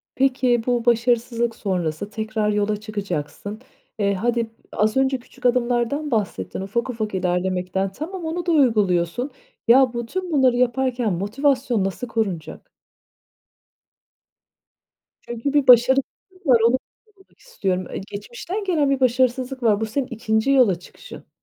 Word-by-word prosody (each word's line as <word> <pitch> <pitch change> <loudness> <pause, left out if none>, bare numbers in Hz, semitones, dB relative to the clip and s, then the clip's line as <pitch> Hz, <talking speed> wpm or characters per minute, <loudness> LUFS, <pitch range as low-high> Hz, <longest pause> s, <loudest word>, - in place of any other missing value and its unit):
Peki, 255 -3 +2
bu 245 -1 0
başarısızlık 235 0 +1
sonrası 180 -1 -2
tekrar 220 -1 -2
yola 210 0 0
çıkacaksın. 205 0 -5 0.4
Eee, 200 -1 +2
hadi 230 +3 -1 0.2
az 215 +4 +1
önce 265 -1 +2
küçük 250 - -16
adımlardan 245 +4 +1
bahsettin, 190 - -2
ufak 235 +6 -2
ufak 215 -4 -3
ilerlemekten. 185 +1 -1
Tamam, 335 - -6
onu 340 +2 -3
da 345 - +1
uyguluyorsun. 220 - +2 0.4
Ya, 250 0 +6
bu 235 -1 -3
tüm 365 +5 -4
bunları 260 -4 +4
yaparken 250 -3 +1
motivasyon 240 +3 0
nasıl 195 +6 -3
korunacak? 195 -9 -4 2.5
Çünkü 240 +4 -4
bir 285 -3 +2
başarısızlık 265 - +3
var, 240 -3 +6
onu 255 +2 +3 0.3
sormak 400 -3 -27
istiyorum. 190 - -2
E, - - -5
geçmişten 240 - -6
gelen 315 -7 +1
bir 275 -1 +1
başarısızlık 255 +1 +1
var. 215 -1 +3
Bu - - +1
senin 255 +4 -2
2'nci 225 +1 0
yola 225 -10 +4
çıkışın. - - -13
235 Hz, 130 wpm, -22 LUFS, 205-265 Hz, 2.5 s, Ya